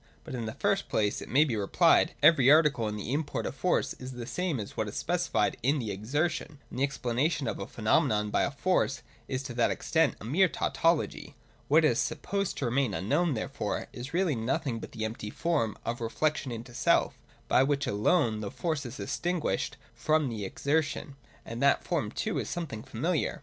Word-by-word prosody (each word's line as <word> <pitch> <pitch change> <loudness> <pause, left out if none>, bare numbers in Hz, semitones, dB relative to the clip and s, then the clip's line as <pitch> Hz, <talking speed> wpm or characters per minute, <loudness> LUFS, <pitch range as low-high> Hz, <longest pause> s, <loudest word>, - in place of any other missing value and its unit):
But, - - -8
in 120 -3 -3
the 110 - -4
first 200 -1 0
place, 105 -1 0
it - - -9
may 145 +4 +5
be 130 -7 -1
replied, 100 -2 +3
every 145 -4 +7
article 150 -7 +5
in 105 - -3
the 105 +5 -4
import 145 0 -2
of - - -3
Force 140 +7 0
is 130 0 -7
the 120 -1 -6
same 145 +3 -2
as 105 - -7
what - - -1
is - - -7
specified - - 0
in 140 +5 +2
the 115 -6 -3
Exertion: 145 - -2
and 125 - -5
the - - +2
explanation 140 +1 0
of - - -3
a - - -5
phenomenon 105 0 +1
by - - +2
a - - +2
Force 140 -2 0 0.2
is 130 0 -3
to 135 -3 -6
that 120 0 +2
extent 160 -3 +1
a - - -9
mere 175 +11 +4
tautology. 165 0 0 0.3
What 155 +2 +5
is 120 -6 +3
sup 155 -1 -2
posed 200 0 -1
to 140 - -2
remain 120 -3 +1
unknown, 145 - +1
therefore, 110 - -3
is 125 +2 -7
really 175 -2 +1
nothing 125 +1 -1
but - - -9
the 110 -1 -3
empty 110 -1 -5
form 150 -4 -1
of 120 +1 -3
reflection 145 +4 -1
into 120 +1 -7
self, - - +2 0.3
by - - +4
which 140 +1 +1
alone 110 - +2
the 105 -2 -4
Force 155 - -2
is 120 +4 -8
distinguished 150 - -2 0.2
from 155 -3 +1
the 110 -4 -4
Exertion, 145 +5 -1 0.2
— - - -28
and 115 +2 -6
that 140 0 +4
form - - -1
too - - -2
is - - -4
something 155 -11 -4
familiar. 155 +10 -1
135 Hz, 200 wpm, -29 LUFS, 115-155 Hz, 0.3 s, every